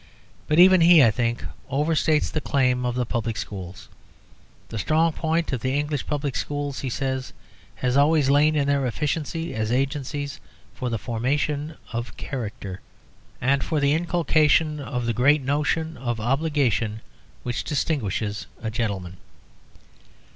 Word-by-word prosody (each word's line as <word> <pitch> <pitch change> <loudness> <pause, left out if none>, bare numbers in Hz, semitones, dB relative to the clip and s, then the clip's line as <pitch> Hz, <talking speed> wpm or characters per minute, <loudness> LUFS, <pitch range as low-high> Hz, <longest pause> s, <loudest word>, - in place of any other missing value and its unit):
But 150 - +1
even 185 0 +8
he, 165 -3 +8
I 115 - +6
think, 120 +1 -1 0.2
overstates 150 +2 +1
the 155 - -2
claim 125 -3 +1
of 120 - -2
the 125 -1 0
public 115 -1 -2
schools. 95 -3 -7 0.8
"The 115 - -5
strong 160 +6 +2
point 165 -1 -1
of 125 - -2
the 130 +3 0
English 145 -2 -2
public 145 -3 -2
schools," 145 -1 -3
he 135 - -3
says, 130 0 -3 0.4
"has 125 0 -1
always 145 0 +4
lain 145 +3 +4
in 145 -2 +2
their 140 -2 +2
efficiency 155 +5 -2
as 110 0 -2
agencies 140 +2 -2 0.3
for 125 - -3
the 115 - -1
formation 140 - -2 0.2
of 115 +1 -4
character 105 -7 -6 0.6
and 135 +1 +2
for 155 - 0
the 140 0 +3
inculcation 155 -2 +2
of 125 -3 -3
the 115 - 0
great 140 +5 +3
notion 150 +3 0
of 120 -2 -3
obligation 125 -4 0 0.4
which 120 -1 -2
distinguishes 110 - -2
a 110 -1 -4
gentleman. 100 -6 -3
140 Hz, 145 wpm, -24 LUFS, 120-150 Hz, 0.8 s, even